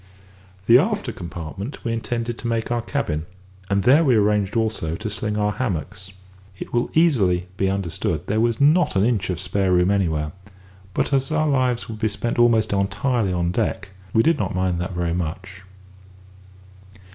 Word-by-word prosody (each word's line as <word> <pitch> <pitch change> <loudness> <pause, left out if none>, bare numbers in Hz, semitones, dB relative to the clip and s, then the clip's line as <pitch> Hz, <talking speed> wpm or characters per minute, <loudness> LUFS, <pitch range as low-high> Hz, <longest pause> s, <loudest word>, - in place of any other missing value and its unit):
The 115 +4 +7
after 210 +6 -1
compartment 85 - -7
we 115 - -1
intended 115 0 -3
to 120 - -4
make 115 0 -1
our 120 -1 +1
cabin, 85 - -3 0.4
and 100 -1 +1
there 140 +6 +5
we 130 -6 +4
arranged 105 -1 +2
also 110 -8 -1
to 110 +4 -5
sling 105 0 -2
our 105 0 +1
hammocks. 95 - -4 0.5
It - - -8
will 120 0 +1
easily 105 - +3
be 95 0 0
understood 90 -5 -2
that - - -24
there 110 +3 0
was 115 -1 +1
not 155 - +4
an 95 +1 +3
inch 110 -6 0
of 90 - -2
spare 95 -2 0
room 90 +2 +3
anywhere; 80 -7 0 0.6
but - - 0
as 135 +2 +1
our 155 0 +1
lives 130 -4 +1
would 110 -1 -7
be 110 - +1
spent 110 +3 -3
almost 115 -3 +3
entirely 105 +2 0
on 85 -1 0
deck, 95 +2 -2 0.2
we 110 - +3
did 165 -2 +2
not - - -2
mind 90 -1 0
that 90 +1 -4
very 85 -1 -1
much. 95 +2 -5
105 Hz, 180 wpm, -22 LUFS, 90-120 Hz, 0.6 s, The